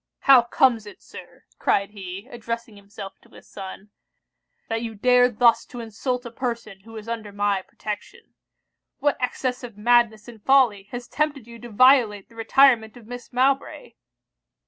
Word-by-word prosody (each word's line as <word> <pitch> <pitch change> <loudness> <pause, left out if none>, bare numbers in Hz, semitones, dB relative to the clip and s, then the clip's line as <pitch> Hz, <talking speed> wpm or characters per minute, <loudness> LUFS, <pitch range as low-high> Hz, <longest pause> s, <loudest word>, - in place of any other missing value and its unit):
'How 270 -3 +7
comes 235 -2 +2
it, 205 - -12
Sir,' - - -13 0.2
cried 200 +1 +1
he, 195 +1 -8
addressing 230 -1 -6
himself 200 -1 -11
to - - -23
his - - -17
son, 195 +1 -10 0.8
'that 225 0 -2
you 225 -2 -5
dare 250 +3 +4
thus 230 0 +3
to 245 - -10
insult 245 +3 -4
a 235 - -7
person 230 -5 -5
who 225 +3 -12
is 215 0 -9
under 225 -3 -5
my 200 -1 0
protection? 215 - -8 0.6
What 290 +1 +1
excess 250 0 -2
of 235 -4 -9
madness 230 -1 +2
and 225 -3 -13
folly 240 -8 +3
has 245 0 -7
tempted 295 -5 -2
you 235 0 -12
to 240 - -10
violate 230 -3 +4
the 230 - -20
retirement 230 -1 +3
of 235 - -15
Miss 245 +2 -9
Mowbray?' 270 +2 0
230 Hz, 165 wpm, -23 LUFS, 210-250 Hz, 0.8 s, How